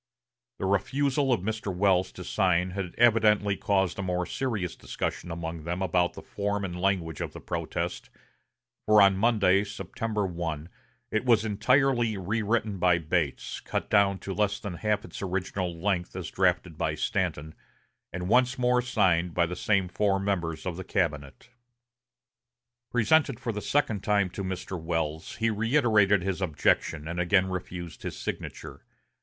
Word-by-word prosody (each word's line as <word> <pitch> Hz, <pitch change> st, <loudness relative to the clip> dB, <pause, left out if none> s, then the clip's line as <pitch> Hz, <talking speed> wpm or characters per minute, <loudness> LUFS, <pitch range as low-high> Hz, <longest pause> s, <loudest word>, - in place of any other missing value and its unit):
The -, -, -3 dB
refusal 135 Hz, +8 st, +1 dB
of 120 Hz, -, +2 dB
Mr. 110 Hz, 0 st, -3 dB
Welles 95 Hz, 0 st, +2 dB
to 90 Hz, -, -8 dB
sign 90 Hz, -1 st, +1 dB
had 95 Hz, -2 st, -5 dB
evidently 105 Hz, -3 st, +4 dB
caused 95 Hz, -1 st, 0 dB
a -, -, 0 dB
more 90 Hz, -1 st, -1 dB
serious 110 Hz, -9 st, -3 dB
discussion -, -, -4 dB
among 85 Hz, -1 st, -5 dB
them 90 Hz, +3 st, -2 dB
about 90 Hz, -1 st, +1 dB
the -, -, -10 dB
form 100 Hz, 0 st, -2 dB
and 90 Hz, -1 st, -5 dB
language 90 Hz, -5 st, 0 dB
of -, -, -4 dB
the -, -, -8 dB
protest; -, -, -4 dB, 0.8 s
for 105 Hz, 0 st, +6 dB
on 100 Hz, -1 st, +6 dB
Monday, 100 Hz, -2 st, +3 dB
September 105 Hz, 0 st, -3 dB
1, 85 Hz, -3 st, -4 dB, 0.4 s
it 110 Hz, -, 0 dB
was 115 Hz, -3 st, +3 dB
entirely 120 Hz, +1 st, +2 dB
rewritten 105 Hz, +1 st, -1 dB
by 90 Hz, -1 st, +4 dB
Bates, 80 Hz, -3 st, -2 dB
cut -, -, -4 dB
down 100 Hz, -2 st, +4 dB
to 95 Hz, -, -6 dB
less 105 Hz, 0 st, 0 dB
than 100 Hz, -, -5 dB
half 105 Hz, +4 st, -1 dB
its -, -, -9 dB
original 95 Hz, -2 st, -3 dB
length 90 Hz, -1 st, -1 dB
as -, -, -5 dB
drafted 80 Hz, -3 st, 0 dB
by -, -, 0 dB
Stanton, 80 Hz, +2 st, -2 dB, 0.6 s
and 90 Hz, 0 st, -4 dB
once 125 Hz, +4 st, +3 dB
more 125 Hz, 0 st, +3 dB
signed 90 Hz, -8 st, +1 dB
by 85 Hz, -, +3 dB
the 90 Hz, +2 st, -5 dB
same 100 Hz, 0 st, +1 dB
four 95 Hz, +1 st, +1 dB
members 85 Hz, -5 st, -2 dB
of 90 Hz, -2 st, -3 dB
the 95 Hz, -, -5 dB
cabinet. 75 Hz, -, -2 dB, 1.4 s
Presented 125 Hz, +2 st, +3 dB
for 120 Hz, -, -2 dB
the 105 Hz, -1 st, -4 dB
second 115 Hz, -8 st, 0 dB
time 100 Hz, -3 st, +2 dB
to 100 Hz, -, -5 dB
Mr. 95 Hz, -1 st, -4 dB
Welles, 80 Hz, -1 st, -3 dB
he 115 Hz, 0 st, +1 dB
reiterated 110 Hz, -4 st, +3 dB
his 95 Hz, 0 st, -2 dB
objection, 80 Hz, -2 st, +1 dB
and 85 Hz, +1 st, -4 dB
again 95 Hz, +2 st, +3 dB
refused 90 Hz, -2 st, -6 dB
his -, -, -5 dB
signature. -, -, -6 dB
95 Hz, 160 wpm, -28 LUFS, 90-110 Hz, 1.4 s, for